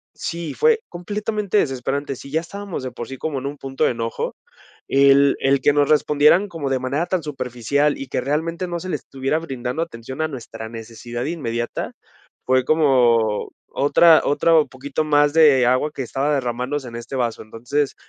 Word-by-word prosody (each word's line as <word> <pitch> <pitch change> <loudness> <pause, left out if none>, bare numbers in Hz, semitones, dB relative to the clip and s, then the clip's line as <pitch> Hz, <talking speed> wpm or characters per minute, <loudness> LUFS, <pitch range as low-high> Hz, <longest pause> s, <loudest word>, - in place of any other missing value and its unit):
sí, 170 -2 -4
fue 460 -1 +3
completamente 210 +3 -2
desesperante. 135 - -1
Si 140 - -11
ya 160 - +2
estábamos 200 -3 -6
de 130 - -4
por 120 0 -7
sí 135 - -7
como 145 -2 -3
en 130 - -8
un 145 +1 -6
punto 135 -1 -3
de - - +3
enojo, 115 -1 -3 0.5
el 140 0 +5
el 135 0 +3
que 145 - +4
nos 145 -1 +2
respondieran 150 +5 +4
como 155 -5 -4
de 135 -1 0
manera 135 +6 -1
tan 185 -3 -1
superficial 140 +1 -1
y 135 - -7
que - - -1
realmente 165 +6 -2
no 175 0 -3
se 185 - -7
le 155 - 0
estuviera 135 +2 -2
brindando 130 -1 -4
atención 130 -1 -7
a 155 - +1
nuestra 115 -4 -8
necesidad 120 +2 -6
inmediata, 120 -7 -3 0.5
fue 130 0 +3
como 120 -8 +3 0.2
otra 160 +3 +5
otro 155 +2 +4
poquito 140 +3 -4
mas 145 0 +3
de 145 -6 +6
agua 130 +4 +2
que 135 - -4
estaba 135 +4 -1
derrmandose 125 +1 -2
en 115 - -10
este 120 +3 -7
vaso. 120 -2 -1
Entonces, 135 +6 -2
140 Hz, 180 wpm, -21 LUFS, 125-155 Hz, 0.5 s, de